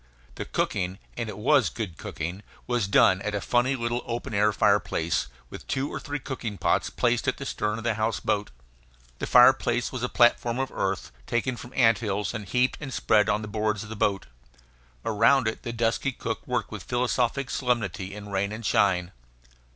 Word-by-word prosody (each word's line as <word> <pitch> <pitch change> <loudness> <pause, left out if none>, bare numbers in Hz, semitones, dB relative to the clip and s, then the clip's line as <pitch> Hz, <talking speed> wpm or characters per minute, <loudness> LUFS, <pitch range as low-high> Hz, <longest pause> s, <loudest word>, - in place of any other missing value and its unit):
The - - -5
cooking 90 0 -1 0.2
and 115 -2 -3
it 95 - -7
was 135 +5 +3
good 105 -8 -5
cooking 85 +5 -5 0.2
was 120 -5 0
done 95 -1 +5
at 105 0 -2
a - - 0
funny 125 +6 +1
little 120 0 -2
open 120 +1 -4
air 105 +1 +3
fireplace, 85 -4 +1 0.2
with - - -10
two 135 +1 -2
or - - -3
three 145 0 -4
cooking 125 -7 -5
pots - - +1
placed - - 0
at - - +1
the - - -6
stern 105 +1 -2
of 115 - -6
the 120 -1 +1
house 110 0 -1
boat. 105 -1 -1 0.7
The - - -3
fireplace 125 -1 +5
was 130 - -5
a 125 - -1
platform 120 0 +3
of 135 0 -2
earth, 95 -1 -2 0.2
taken 120 +2 0
from 120 +1 -10
anthills, 110 -4 +2
and 110 -4 -5
heaped 125 +3 +1
and 140 -3 -5
spread 105 -3 +3
on 105 +1 +1
the - - -5
boards 105 0 -1
of 105 - -10
the 110 - -6
boat. 100 -1 0 0.8
Around 115 +3 +4
it 110 - -2
the 120 - -4
dusky 115 +3 0
cook 115 -1 -5
worked 125 -2 -2
with 105 -3 -6
philosophic 125 +2 0
solemnity 105 -7 -1
in 105 0 -8
rain 100 +1 -1
and 110 +1 -6
shine. 90 -4 +2
115 Hz, 190 wpm, -26 LUFS, 105-125 Hz, 0.8 s, done